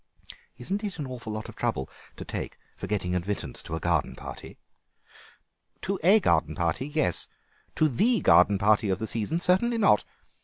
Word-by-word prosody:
"Isn't 195 Hz, -, -3 dB
it 200 Hz, -4 st, -4 dB
a 130 Hz, -6 st, -6 dB
lot 110 Hz, 0 st, -4 dB
of -, -, -11 dB
trouble 65 Hz, -, -2 dB, 0.3 s
to -, -, -8 dB
take -, -, -5 dB, 0.2 s
for -, -, -6 dB
getting 95 Hz, -4 st, -1 dB
admittance 90 Hz, +3 st, -3 dB
to 80 Hz, -, -5 dB
a -, -, -3 dB
garden 85 Hz, -3 st, 0 dB
party?" -, -, -9 dB, 1.2 s
"To 195 Hz, 0 st, -2 dB
a 195 Hz, +6 st, +6 dB
garden 80 Hz, -, +1 dB
party, 85 Hz, -, -1 dB
yes; 150 Hz, -, +1 dB, 0.5 s
to 155 Hz, -, +3 dB
the 215 Hz, -, +2 dB
garden 100 Hz, -3 st, +5 dB
party 105 Hz, +1 st, +3 dB
of 95 Hz, -, +1 dB
the 110 Hz, -, -4 dB
season, 115 Hz, +9 st, -1 dB
certainly 210 Hz, +7 st, +2 dB
not. 200 Hz, -, +4 dB
110 Hz, 165 wpm, -27 LUFS, -, 1.2 s, a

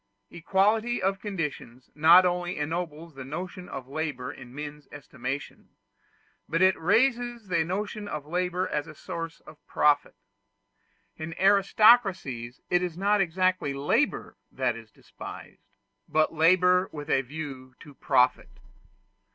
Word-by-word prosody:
Equality 210 Hz, +7 st, +1 dB
of 195 Hz, +1 st, 0 dB
conditions 150 Hz, -, -5 dB
not 165 Hz, +5 st, +7 dB
only 180 Hz, 0 st, -1 dB
ennobles 160 Hz, +1 st, -4 dB
the 135 Hz, -1 st, -8 dB
notion 180 Hz, +6 st, -7 dB
of 130 Hz, -2 st, -7 dB
labor 140 Hz, -3 st, -4 dB
in 125 Hz, -2 st, -12 dB
men's 145 Hz, +2 st, -8 dB
estimation, 140 Hz, -1 st, -7 dB, 0.8 s
but 165 Hz, +2 st, 0 dB
it 185 Hz, 0 st, +5 dB
raises 240 Hz, +2 st, +1 dB
the 170 Hz, -3 st, +2 dB
notion 205 Hz, +4 st, -4 dB
of 150 Hz, -6 st, -5 dB
labor 180 Hz, +3 st, -1 dB
as 150 Hz, +1 st, -3 dB
a 155 Hz, -, -11 dB
source 165 Hz, +2 st, -7 dB
of 155 Hz, 0 st, -16 dB
profit. 145 Hz, -1 st, +2 dB, 1.0 s
In 160 Hz, +1 st, -6 dB
aristocracies 195 Hz, -, +3 dB
it 180 Hz, -, +2 dB
is 175 Hz, -2 st, -4 dB
not 200 Hz, +2 st, +2 dB
exactly 185 Hz, -4 st, 0 dB
labor 140 Hz, +1 st, 0 dB
that 120 Hz, -, -1 dB
is 115 Hz, -1 st, -11 dB
despised, -, -, -12 dB, 0.4 s
but 155 Hz, +1 st, +2 dB
labor 180 Hz, +3 st, +4 dB
with 145 Hz, -1 st, -7 dB
a 135 Hz, -, +3 dB
view 135 Hz, -2 st, -8 dB
to 145 Hz, -3 st, -13 dB
profit. 125 Hz, -1 st, +1 dB
165 Hz, 130 wpm, -27 LUFS, 145-185 Hz, 1.0 s, not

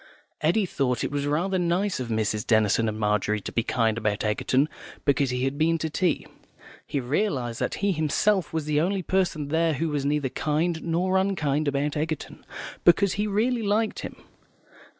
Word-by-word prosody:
Eddy 185 Hz, +7 st, +2 dB
thought 125 Hz, -8 st, -1 dB
it -, -, -2 dB
was 145 Hz, 0 st, -1 dB
rather 180 Hz, +6 st, 0 dB
nice 180 Hz, +2 st, 0 dB
of 125 Hz, -, -3 dB
Mrs. 110 Hz, -1 st, -1 dB
Denison 110 Hz, 0 st, +3 dB
and 110 Hz, -, -5 dB
Margery 105 Hz, 0 st, +1 dB
to -, -, -6 dB
be 115 Hz, -, +1 dB
kind 115 Hz, -1 st, 0 dB
about 105 Hz, -2 st, -1 dB
Egerton 130 Hz, +6 st, +1 dB, 0.4 s
because 140 Hz, -1 st, +2 dB
he 125 Hz, 0 st, -1 dB
had 135 Hz, +2 st, -1 dB
been 165 Hz, +1 st, +3 dB
to 160 Hz, -1 st, -3 dB
tea. 175 Hz, +2 st, 0 dB, 0.6 s
He 140 Hz, -, -1 dB
realised 130 Hz, -, -1 dB
that -, -, -1 dB
he 200 Hz, -, +3 dB
himself 175 Hz, +3 st, +1 dB
was 160 Hz, -2 st, -2 dB
the 150 Hz, 0 st, +1 dB
only 190 Hz, +2 st, 0 dB
person 170 Hz, -6 st, 0 dB
there 165 Hz, +1 st, +2 dB
who 160 Hz, +4 st, -1 dB
was 145 Hz, -2 st, -1 dB
neither 145 Hz, -1 st, 0 dB
kind 160 Hz, +4 st, -1 dB
nor 180 Hz, +3 st, +1 dB
unkind 155 Hz, -7 st, 0 dB
about 145 Hz, +1 st, 0 dB
Egerton, 155 Hz, 0 st, -4 dB, 0.4 s
because 180 Hz, +2 st, +5 dB
he 210 Hz, +1 st, -1 dB
really 230 Hz, +4 st, +1 dB
liked 215 Hz, +1 st, 0 dB
him. -, -, -6 dB
150 Hz, 180 wpm, -26 LUFS, 130-180 Hz, 0.6 s, because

